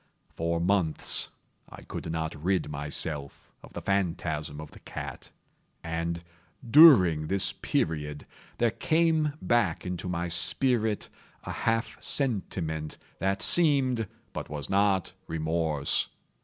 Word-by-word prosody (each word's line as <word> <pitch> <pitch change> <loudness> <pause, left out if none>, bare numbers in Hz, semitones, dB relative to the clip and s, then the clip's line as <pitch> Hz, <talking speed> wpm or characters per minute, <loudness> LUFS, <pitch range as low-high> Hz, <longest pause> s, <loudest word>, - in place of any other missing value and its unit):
For 85 0 -1
months 90 -2 +2 0.4
I - - -12
could 80 - -6
not 80 0 -2
rid 90 +3 -1
myself 75 0 -5
of - - -15
the - - -7
phantasm 80 -6 -1
of 75 -1 -9
the - - -14
cat; - - -8 0.5
and, 85 +1 -3 0.4
during 100 - +7
this 95 +2 0
period, 75 -2 -2 0.3
there 120 -1 +2
came 160 +2 +1
back 115 -9 +1
into 90 0 -4
my 85 0 -2
spirit 110 +5 +1 0.4
a - - -5
half 115 0 -1
sentiment 90 - -1 0.2
that 95 +2 0
seemed, 135 - +4 0.3
but - - -6
was 75 +2 -5
not, 100 -1 +2
remorse. 80 -2 -1
90 Hz, 115 wpm, -28 LUFS, 80-110 Hz, 0.5 s, during